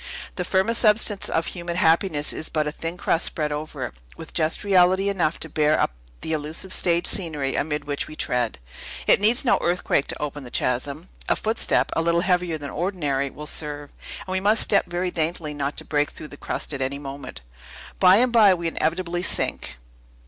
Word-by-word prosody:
The 180 Hz, -, -2 dB
firmest 190 Hz, +6 st, +1 dB
substance 210 Hz, -2 st, +3 dB
of 165 Hz, -, 0 dB
human 175 Hz, -1 st, -5 dB
happiness 165 Hz, -3 st, +2 dB
is 155 Hz, -, -5 dB
but 155 Hz, -1 st, 0 dB
a 150 Hz, -, -2 dB
thin 165 Hz, +3 st, -5 dB
crust 165 Hz, -, 0 dB
spread 150 Hz, -2 st, -2 dB
over 150 Hz, +1 st, -4 dB
it, -, -, -8 dB, 0.2 s
with 160 Hz, -, -10 dB
just 160 Hz, -1 st, 0 dB
reality 190 Hz, 0 st, +4 dB
enough 175 Hz, -5 st, 0 dB
to -, -, -3 dB
bear 150 Hz, 0 st, +2 dB
up -, -, +1 dB, 0.3 s
the 160 Hz, -, -2 dB
illusive 155 Hz, +5 st, -2 dB
stage 170 Hz, 0 st, +2 dB
scenery 150 Hz, -7 st, 0 dB
amid 150 Hz, 0 st, -2 dB
which 145 Hz, -1 st, -3 dB
we 155 Hz, -, -9 dB
tread. 120 Hz, -, -1 dB, 0.5 s
It -, -, +5 dB
needs 235 Hz, +6 st, +3 dB
no 245 Hz, -, +4 dB
earthquake 175 Hz, -5 st, +1 dB
to -, -, -2 dB
open 145 Hz, -1 st, -4 dB
the 125 Hz, -, -9 dB
chasm. 140 Hz, +8 st, -2 dB, 0.2 s
A -, -, +4 dB
footstep, 220 Hz, +1 st, +1 dB
a -, -, +2 dB
little 170 Hz, +1 st, +2 dB
heavier 180 Hz, -3 st, +1 dB
than 145 Hz, -3 st, -7 dB
ordinary, 150 Hz, -6 st, -1 dB
will 150 Hz, +3 st, -9 dB
serve; 145 Hz, -1 st, -2 dB, 0.3 s
and 185 Hz, -, -7 dB
we 190 Hz, -, +1 dB
must 210 Hz, +3 st, +5 dB
step 200 Hz, -, +2 dB
very 175 Hz, +1 st, -2 dB
daintily, 160 Hz, -2 st, -2 dB
not 145 Hz, 0 st, -3 dB
to -, -, -2 dB
break 145 Hz, 0 st, +1 dB
through 155 Hz, -, -9 dB
the -, -, -10 dB
crust 145 Hz, -, -3 dB
at 135 Hz, -, -4 dB
any 135 Hz, +1 st, -1 dB
moment. 135 Hz, -, -8 dB, 0.6 s
By 185 Hz, 0 st, +7 dB
and 250 Hz, +2 st, +3 dB
by, 210 Hz, -5 st, +6 dB
we 170 Hz, -1 st, -3 dB
inevitably 170 Hz, +2 st, -1 dB
sink! 175 Hz, -, -1 dB
165 Hz, 200 wpm, -24 LUFS, 150-185 Hz, 0.6 s, By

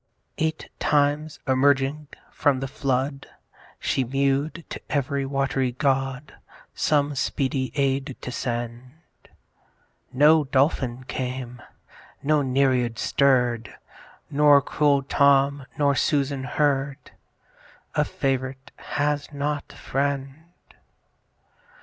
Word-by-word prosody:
Eight 160 Hz, 0 st, -2 dB
times 150 Hz, +1 st, +1 dB
emerging 135 Hz, +2 st, +2 dB, 0.2 s
from 145 Hz, -3 st, +1 dB
the 135 Hz, -, -3 dB
flood 135 Hz, 0 st, -2 dB, 0.5 s
She 135 Hz, -, 0 dB
mew'd 140 Hz, +5 st, -1 dB
to -, -, -6 dB
ev'ry 140 Hz, -1 st, -1 dB
wat'ry 135 Hz, -2 st, 0 dB
god, 135 Hz, +2 st, -1 dB, 0.4 s
Some 145 Hz, -1 st, +1 dB
speedy 130 Hz, -1 st, -1 dB
aid 135 Hz, -1 st, 0 dB
to 125 Hz, -, -5 dB
send. 120 Hz, +1 st, -4 dB, 1.2 s
No 150 Hz, +3 st, +5 dB
Dolphin 130 Hz, -2 st, +1 dB
came, 125 Hz, -1 st, -5 dB, 0.6 s
no 150 Hz, +1 st, +3 dB
Nereid 130 Hz, -3 st, +1 dB
stirr'd: 125 Hz, -5 st, +1 dB, 0.6 s
Nor 145 Hz, 0 st, +6 dB
cruel 140 Hz, -1 st, +2 dB
Tom, 140 Hz, 0 st, +3 dB
nor 145 Hz, -2 st, +3 dB
Susan 140 Hz, -1 st, 0 dB
heard. 140 Hz, 0 st, -1 dB, 0.8 s
A -, -, +2 dB
Fav'rite 130 Hz, 0 st, -3 dB, 0.2 s
has 145 Hz, 0 st, 0 dB
not 145 Hz, 0 st, -3 dB
friend! 135 Hz, 0 st, -2 dB
135 Hz, 95 wpm, -24 LUFS, 130-145 Hz, 1.2 s, Nor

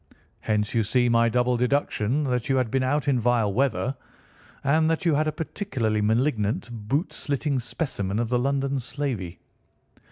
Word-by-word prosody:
Hence, 105 Hz, -1 st, -1 dB
you 115 Hz, -, +3 dB
see, 120 Hz, +3 st, +2 dB
my 115 Hz, 0 st, +4 dB
double 125 Hz, +1 st, +1 dB
deduction 125 Hz, 0 st, +1 dB
that 125 Hz, -3 st, -1 dB
you 135 Hz, -, +3 dB
had 125 Hz, -4 st, 0 dB
been 135 Hz, -, +1 dB
out 140 Hz, +2 st, 0 dB
in 135 Hz, -3 st, +3 dB
vile 115 Hz, -3 st, +2 dB
weather, 130 Hz, +2 st, 0 dB, 0.7 s
and 155 Hz, +3 st, +3 dB
that 165 Hz, +3 st, -1 dB
you 165 Hz, -, +4 dB
had 155 Hz, +2 st, +2 dB
a -, -, +1 dB
particularly 125 Hz, -, -2 dB
malignant 110 Hz, 0 st, 0 dB
boot 120 Hz, -, -2 dB
slitting 140 Hz, -1 st, -1 dB
specimen 115 Hz, -, -3 dB
of 115 Hz, 0 st, 0 dB
the 125 Hz, 0 st, +2 dB
London 140 Hz, +1 st, 0 dB
slavey. 120 Hz, -9 st, -4 dB
125 Hz, 165 wpm, -25 LUFS, 115-140 Hz, 0.7 s, my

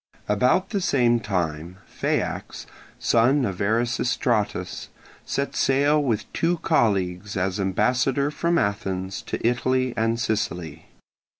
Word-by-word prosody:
About 125 Hz, -, +2 dB
the 200 Hz, -3 st, 0 dB
same 120 Hz, -7 st, +3 dB
time 90 Hz, -4 st, -3 dB
Phaeax, -, -, -3 dB, 0.3 s
son 125 Hz, +4 st, +3 dB
of 95 Hz, -1 st, -4 dB
Erasistratus, 120 Hz, +1 st, 0 dB, 0.4 s
set 140 Hz, 0 st, -2 dB
sail 145 Hz, +3 st, +3 dB
with 115 Hz, -6 st, -2 dB
two 170 Hz, +1 st, +1 dB
colleagues 100 Hz, -, +1 dB
as 95 Hz, +2 st, -1 dB
ambassador 125 Hz, +8 st, +1 dB
from 170 Hz, +2 st, 0 dB
Athens 95 Hz, -, -2 dB
to -, -, -2 dB
Italy 130 Hz, +1 st, +1 dB
and 115 Hz, 0 st, 0 dB
Sicily. 90 Hz, -9 st, -3 dB
115 Hz, 110 wpm, -24 LUFS, 95-130 Hz, 0.4 s, same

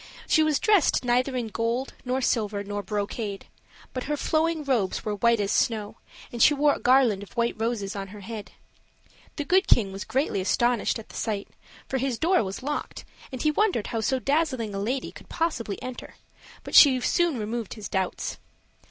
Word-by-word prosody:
She 315 Hz, -, +4 dB
was 310 Hz, -2 st, +2 dB
dressed 405 Hz, -, +3 dB
neither 250 Hz, +2 st, +1 dB
in 240 Hz, -3 st, -2 dB
gold, 230 Hz, +4 st, -2 dB
nor 255 Hz, +1 st, -1 dB
silver, 210 Hz, -5 st, 0 dB
nor 205 Hz, 0 st, -4 dB
brocade; 205 Hz, 0 st, -4 dB, 0.5 s
but 255 Hz, -, -4 dB
her 295 Hz, +2 st, -1 dB
flowing 320 Hz, +1 st, 0 dB
robes 240 Hz, -9 st, 0 dB
were 210 Hz, -, -1 dB
white 230 Hz, +3 st, +2 dB
as 200 Hz, -1 st, 0 dB
snow, 215 Hz, -3 st, 0 dB, 0.3 s
and 235 Hz, -, -4 dB
she 295 Hz, -, +6 dB
wore 290 Hz, 0 st, +4 dB
a -, -, -5 dB
garland 250 Hz, -6 st, +4 dB
of 200 Hz, -, -11 dB
white 235 Hz, 0 st, +1 dB
roses 220 Hz, -3 st, -2 dB
on 195 Hz, -1 st, -4 dB
her 205 Hz, +1 st, -11 dB
head. 215 Hz, 0 st, -7 dB, 0.8 s
The 295 Hz, -, -3 dB
Good 375 Hz, +5 st, +3 dB
King 200 Hz, -5 st, +3 dB
was 195 Hz, +1 st, -6 dB
greatly 250 Hz, -4 st, -1 dB
astonished 240 Hz, +4 st, +1 dB
at 225 Hz, -, -11 dB
the -, -, -12 dB
sight; 205 Hz, -3 st, -3 dB, 0.4 s
for 265 Hz, -, -1 dB
his 260 Hz, -2 st, -1 dB
door 345 Hz, -1 st, +3 dB
was 195 Hz, +4 st, -6 dB
locked, 295 Hz, +2 st, -4 dB, 0.3 s
and 255 Hz, -2 st, -5 dB
he 305 Hz, -, +3 dB
wondered 375 Hz, -, +1 dB
how 225 Hz, -, -2 dB
so 265 Hz, +4 st, +1 dB
dazzling 260 Hz, -6 st, 0 dB
a 195 Hz, -, -3 dB
lady 250 Hz, +7 st, -2 dB
could -, -, -14 dB
possibly 275 Hz, -, -2 dB
enter; 255 Hz, -1 st, -7 dB, 0.5 s
but -, -, -9 dB
she 265 Hz, -4 st, +8 dB
soon 335 Hz, +3 st, +1 dB
removed 225 Hz, 0 st, -4 dB
his 215 Hz, -3 st, -7 dB
doubts. 190 Hz, -2 st, -2 dB
240 Hz, 190 wpm, -26 LUFS, 210-275 Hz, 0.8 s, she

